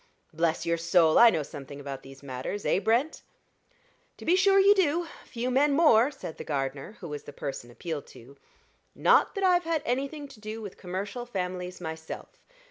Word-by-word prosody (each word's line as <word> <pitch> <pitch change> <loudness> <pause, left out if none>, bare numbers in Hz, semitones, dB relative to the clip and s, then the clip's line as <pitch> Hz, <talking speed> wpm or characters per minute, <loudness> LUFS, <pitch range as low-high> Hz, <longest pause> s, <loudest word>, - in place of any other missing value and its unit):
Bless 165 0 0
your 170 0 +1
soul! 165 -1 +4
I 235 - +9
know 160 -7 0
something 140 -1 -9
about 140 -1 -6
these 135 +1 -14
matters, 130 +9 -5
eh, - - +3
Brent?" 235 +10 +1 1.0
"To - - -11
be 345 - +4
sure 390 +1 +4
you 400 +1 +7
do 345 -3 +1 0.2
few 245 +1 -3
men 280 +3 +3
more," 275 -6 +5
said 270 - -8
the - - -6
gardener, 135 +4 -3
who 175 - -6
was 150 -1 -6
the - - -8
person 135 -4 -6
appealed 150 +4 -6
to. 130 +4 -15 0.6
"Not - - +4
that 395 - -2
I've 360 -2 +4
had 325 -2 0
anything 275 +4 -2
to 220 - -14
do 215 +1 -6
with 205 -4 -8
commercial 200 +7 -5
families 180 -4 -4
myself. 160 -2 -7
190 Hz, 185 wpm, -28 LUFS, -, 1.0 s, I